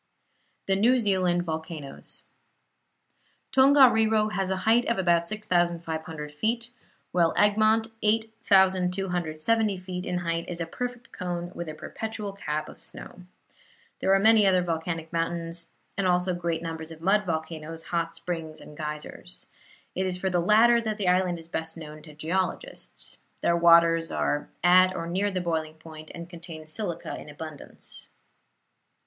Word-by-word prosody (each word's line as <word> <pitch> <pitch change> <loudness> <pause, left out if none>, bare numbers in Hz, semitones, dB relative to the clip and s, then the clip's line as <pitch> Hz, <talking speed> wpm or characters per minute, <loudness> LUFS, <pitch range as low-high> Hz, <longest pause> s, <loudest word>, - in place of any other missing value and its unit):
THE 195 - +2
NEW 235 +6 +4
ZEALAND 185 -6 +2
VOLCANOES 160 -3 -6 1.3
Tongariro 230 -6 +5
has 195 -2 -1
a 190 - +1
height 230 +2 +4
of 235 - +1
about 170 -2 +2
6,500 165 -6 -1
feet, 230 +9 -1 0.4
while 170 -2 +2
Egmont, 215 +2 +4
8,270 190 -2 +2
feet 180 0 -6
in 180 - -1
height, 170 -1 -2
is 175 -1 -4
a 165 - -1
perfect 245 +7 -6
cone 175 -1 -4
with 170 -2 -5
a 155 - -6
perpetual 220 +2 -5
cap 155 -6 -3
of - - -12
snow. 180 - -10 0.8
There 190 - +1
are - - +4
many 215 0 +6
other 185 -1 +4
volcanic 165 -1 -3
mountains, 165 0 -2 0.3
and 195 -2 0
also 180 0 +2
great 170 -1 -2
numbers 160 -1 -5
of 160 -1 -10
mud 195 +5 +3
volcanoes, 160 -1 -4
hot 165 -1 -2
springs 165 -3 -5
and 150 - -12
geysers. 150 - -7 0.5
It 190 +1 -1
is 180 -1 -1
for 190 +1 -1
the 175 - +2
latter 230 +5 +5
that 215 -2 -2
the 195 -4 +1
island 180 -1 +2
is 165 -1 -10
best 160 0 -4
known 155 -1 -9
to 150 -1 -14
geologists. 185 - -3 0.2
Their 170 - +3
waters 170 -1 +5
are 145 - -1
at 185 +1 +6
or 165 - -3
near 190 +4 0
the 185 -2 -2
boiling 160 -2 -2
point 155 -1 -11
and 170 0 -7
contain 165 -2 -9
silica 170 +1 -4
in - - -11
abundance. 150 0 -9
175 Hz, 150 wpm, -27 LUFS, 165-200 Hz, 1.3 s, many